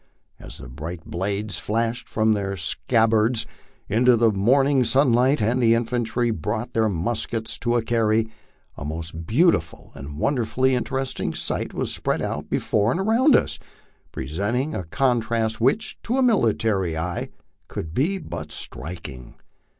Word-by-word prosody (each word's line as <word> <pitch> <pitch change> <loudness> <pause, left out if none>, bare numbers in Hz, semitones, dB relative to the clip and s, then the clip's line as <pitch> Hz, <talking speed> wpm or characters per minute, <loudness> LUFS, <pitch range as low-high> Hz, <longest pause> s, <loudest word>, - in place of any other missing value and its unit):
As - - -10
the - - -10
bright 80 +7 -7
blades 100 +4 -2
flashed 115 +2 -2
from 110 0 +2
their 100 -1 -2
scabbards 110 +5 +2 0.4
into 120 +3 +4
the 115 -1 +4
morning 130 +7 +3
sunlight, 130 0 +3
and 120 +4 +1
the 115 -1 +5
infantry 120 0 0
brought 110 +6 -3
their 110 -1 +2
muskets 110 +4 -2
to 120 0 0
a 120 - +1
carry, 110 -1 +2 0.5
a - - -7
most 80 +2 -5
beautiful 125 - +1
and 70 +2 -8
wonderfully 130 - +1
interesting 130 +1 -2
sight - - -2
was - - -1
spread - - -1
out - - -4
before 105 +1 +1
and 130 - 0
around 230 +8 +4
us, - - +1 0.5
presenting 105 - -2
a 90 - -4
contrast 115 +1 0
which, 175 - +1
to 245 +3 -1
a 265 - +3
military 110 - +2
eye, 85 +2 -3 0.4
could 80 0 -6
but 170 - -2
be - - -17
striking. 75 -7 -7
115 Hz, 140 wpm, -23 LUFS, 95-125 Hz, 0.5 s, the